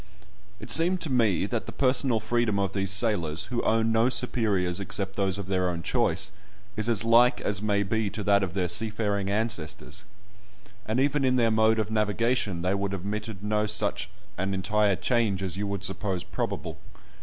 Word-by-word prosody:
It 110 - 0
seemed 175 +3 +4
to 155 - -1
me 110 -7 +2
that 115 +2 -3
the - - -5
personal 130 -3 +2
freedom 110 -1 0
of 100 -1 -1
these 95 -1 -1
sailors, 95 -5 +1
who 120 - +1
own 115 0 +2
no 115 +2 +3
superiors 105 -8 0
except 100 0 -3
those 95 -1 0
of 100 - -5
their 90 -1 0
own 85 -1 -4
choice, - - 0 0.4
is 110 +2 0
as 115 -3 +2
like 120 +2 +5
as 100 -1 -1
may 100 -1 +1
be 110 +1 -1
to 105 - -5
that 100 0 +3
of 95 -2 -3
their 90 -2 0
seafaring 105 0 0
ancestors. 100 -7 -3 0.9
And 110 +3 0
even 140 +1 +1
in 130 -1 +3
their 115 -3 +3
mode 110 0 +3
of 110 -1 -1
navigation 110 -3 0
they 90 - 0
have 100 0 -1
admitted 100 +1 -5
no 105 0 0
such 105 -1 -2 0.3
an 95 +1 -1
entire 105 +1 +1
change 100 -1 0
as 90 -2 -2
you 100 +1 -3
would 100 -1 -4
suppose 95 -2 -2
probable. 80 -1 -4
105 Hz, 185 wpm, -27 LUFS, 95-115 Hz, 0.9 s, like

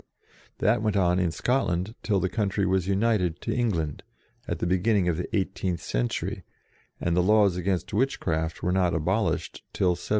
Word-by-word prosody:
That 105 +1 +2
went 105 -2 +1
on 90 -1 +3
in 90 -2 +2
Scotland 95 -1 0
till 105 -3 +1
the 95 - +1
country 100 -1 0
was 95 -1 +1
united 100 -4 +1
to - - -2
England, 85 - -1 0.5
at - - -2
the - - -2
beginning 95 +2 +2
of 85 - +2
the 90 +6 -4
eighteenth 95 -2 -2
century, - - -2 0.6
and 85 0 0
the 90 - +4
laws 100 -1 +4
against 90 +1 -2
witchcraft 85 -9 -1
were 90 - +1
not 90 -2 +2
abolished 95 +8 -1
till 95 - +2
1736. 90 0 -3
95 Hz, 170 wpm, -26 LUFS, 85-105 Hz, 0.6 s, the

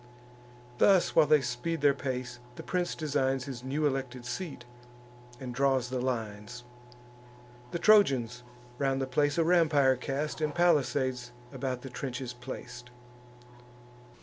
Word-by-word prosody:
Thus 195 -3 +4
while 155 -2 +6
they 150 -1 +5
speed 130 +6 -3
their 145 -1 +5
pace, 130 -3 -4 0.2
the - - -8
prince 180 -1 -1
designs 135 -4 0
His 130 -3 -7
new 145 +4 -1
elected 130 -3 -2
seat, 140 -2 -5 0.7
and 125 -2 -6
draws 135 -1 +1
the 130 -1 -1
lines. 115 -1 -4 1.1
The 170 - -3
Trojans 135 - +4 0.4
round 135 -1 +1
the 135 - 0
place 145 +4 +1
a 165 - +4
rampire 155 -6 +4
cast, 140 +5 -3
And 150 0 -1
palisades 130 -7 +1 0.2
about 130 -2 -4
the 135 - -8
trenches 125 -1 -5
plac'd. 125 0 -9
135 Hz, 130 wpm, -29 LUFS, 125-150 Hz, 1.1 s, while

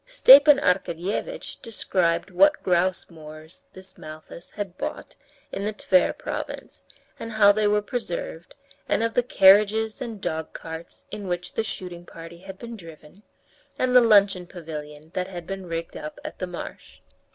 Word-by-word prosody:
Stepan 290 - +8
Arkadyevitch 190 - -2
described 190 -6 -1
what 295 +11 +4
grouse 180 +1 +1
moors 155 0 -13
this 185 0 -11
Malthus 155 +2 -10
had 200 -4 -6
bought - - -6 0.4
in 195 - -4
the 210 +1 -2
Tver 185 -3 +2
province, - - -6 0.3
and 230 0 -6
how 205 -2 +6
they 210 0 +1
were 210 0 +2
preserved, 175 -7 -5 0.3
and - - +1
of 230 0 -1
the 245 - +3
carriages 215 0 +4
and 230 -4 -6
dogcarts 160 0 -6
in 205 -2 -6
which 180 0 -4
the 225 - -1
shooting 180 -5 -6
party 165 +1 -11
had 190 +1 -10
been 235 +2 -8
driven, 165 -1 -14 0.6
and 255 0 0
the 250 - +9
luncheon 200 -5 +4
pavilion 155 -3 -9
that 180 0 -2
had 175 -3 -8
been 195 0 -6
rigged 165 0 -5
up 150 - -7
at - - -7
the 185 - -3
marsh. 175 -1 -9
190 Hz, 155 wpm, -24 LUFS, 170-215 Hz, 0.6 s, the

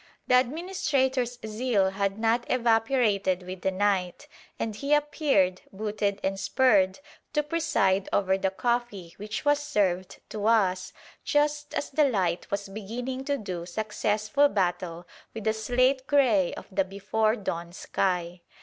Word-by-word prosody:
The 250 0 +5
administrator's 265 -4 -1
zeal 215 -3 +1
had 195 0 -1
not 230 +2 +1
evaporated 225 -6 +2
with 185 0 -7
the 190 - +1
night, 190 -2 -1 0.3
and 220 -2 -3
he 280 +7 +2
appeared, 290 - +1
booted 205 0 -2
and 195 0 -1
spurred, 195 -2 +3 0.3
to 300 -1 +2
preside 210 - +1
over 190 -1 +2
the 190 0 0
coffee 210 -4 -2
which 215 +6 -5
was 290 0 +4
served 190 -10 -1
to 210 0 -2
us 185 -5 +2 0.3
just 295 0 0
as - - -2
the 300 +2 +3
light 180 -7 -1
was 200 0 -3
beginning 240 +6 -5
to 285 0 0
do 185 -7 -5
successful 215 +6 +1
battle 175 -4 -1 0.3
with 220 - -5
the 220 0 +2
slate 255 +4 +1
grey 235 -11 +3
of - - -9
the 195 +1 +2
before 205 +3 0
dawn 170 -6 -4
sky. 180 -1 -2
215 Hz, 140 wpm, -27 LUFS, 190-255 Hz, 0.3 s, The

